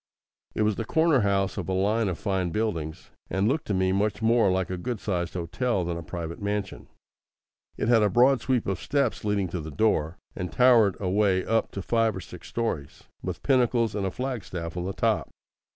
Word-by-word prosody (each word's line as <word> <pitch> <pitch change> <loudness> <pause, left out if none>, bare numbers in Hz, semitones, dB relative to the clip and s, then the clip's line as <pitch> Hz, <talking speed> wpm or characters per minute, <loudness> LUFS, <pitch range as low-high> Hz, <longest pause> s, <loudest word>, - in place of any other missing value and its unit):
It 110 - +1
was 105 -1 +1
the 115 - -1
corner 160 +4 +3
house 100 -2 +1
of 95 - -5
a - - 0
line 105 +4 +1
of 90 - -3
fine 95 -3 -1
buildings, 80 -6 -3 0.2
and 95 +2 +1
looked 145 +5 0
to 105 - 0
me 95 0 +2
much 100 +2 0
more 115 -2 +3
like 95 0 -1
a - - -1
good 115 +5 -4
sized 90 -4 -2
hotel 90 +4 -1
than 85 0 -2
a 85 - -5
private 85 +1 -6
mansion. 100 -1 -3 0.9
It - - -1
had 115 -2 +5
a 105 - +3
broad 125 +5 +4
sweep 130 -3 0
of 95 -3 -2
steps 140 -1 0
leading 105 -2 0
to 90 - -3
the 80 - -7
door, 80 -1 +1 0.2
and 90 -3 -4
towered 120 -6 +5
away 95 -1 +1
up 115 0 +1
to 100 - -5
five 115 -1 +1
or - - -4
six - - -11
stories, 85 -12 -3 0.2
with - - -5
pinnacles 120 -4 +2
and 100 -2 -1
a - - 0
flagstaff 95 -9 -5
on 90 0 -3
the 95 - -3
top. - - 0
100 Hz, 205 wpm, -26 LUFS, 90-115 Hz, 0.9 s, had